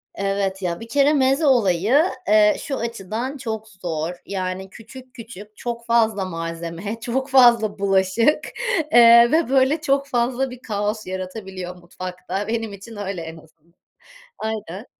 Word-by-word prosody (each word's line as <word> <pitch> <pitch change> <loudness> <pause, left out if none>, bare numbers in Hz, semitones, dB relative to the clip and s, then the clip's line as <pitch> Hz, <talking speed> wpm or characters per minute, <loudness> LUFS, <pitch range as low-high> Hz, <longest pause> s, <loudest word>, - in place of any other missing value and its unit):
Evet 195 -1 -2
ya. 175 -2 -2
Bir 230 - -9
kere 280 +5 +3
meze 270 +2 +2
olayı, 235 - +3 0.2
eee, 210 0 +5
şu 275 - -4
açıdan 230 +4 -4
çok 220 -4 -5
zor. 175 -4 -4
Yani, 190 0 -4
küçük 250 +5 -13
küçük 215 -3 -11
çok 235 -1 -5
fazla 225 -4 +2
malzeme, 170 +4 -5
çok 260 +4 -3
fazla 235 -6 +5
bulaşık, 195 +7 +2 0.5
eee, 235 0 +8
ve 320 -3 +2
böyle 270 +4 +3
çok 280 -2 +1
fazla 255 +1 0
bir 250 0 -11
kaos 210 -1 -3
yaratabiliyor 185 -1 -6
mutfakta. 180 +2 -6
Benim 225 -2 -3
için 200 +3 -11
öyle 195 -3 -4
en 165 0 -8
azından. 160 +1 -21 0.6
Aynen. 215 -2 -5
215 Hz, 140 wpm, -22 LUFS, 190-240 Hz, 0.6 s, eee